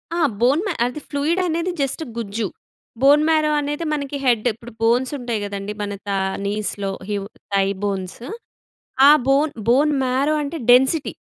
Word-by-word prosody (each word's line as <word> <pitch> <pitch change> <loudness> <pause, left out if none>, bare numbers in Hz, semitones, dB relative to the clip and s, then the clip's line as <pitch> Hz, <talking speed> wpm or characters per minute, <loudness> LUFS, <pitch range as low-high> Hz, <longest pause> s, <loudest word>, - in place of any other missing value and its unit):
ఆ! 345 - -1 0.2
బోన్ 270 +8 +3
మా 375 - -1
అది 250 +5 -4
ఫ్లూయిడనేది 335 +4 0
జస్ట్ 275 +4 -2
గుజ్జు. 220 -1 -3 0.5
బోన్ 290 +3 +6
మ్యారో 310 -1 +3
అనేది 295 +3 -3
మనకి 285 -1 -3
హెడ్డ్. 240 -2 +2
ఇప్పుడు 235 +2 -13
బోన్సుంటయి 245 0 0
గదండి, 200 0 -5
మన 205 0 -3
తా 200 - 0 0.3
నీస్‌లో, 205 -1 -2 0.2
హివ్ 200 -1 -2 0.3
తై 195 -1 +3 0.2
బోన్స్. 195 +1 -3 0.9
ఆ - - +9 0.2
బోన్ 280 +3 +3 0.2
బోన్ 285 +5 +4
మ్యారో 265 +4 +1
అంటే 290 +3 -4
డెన్సిటీ. 265 +5 +4
260 Hz, 145 wpm, -21 LUFS, 210-300 Hz, 0.9 s, ఆ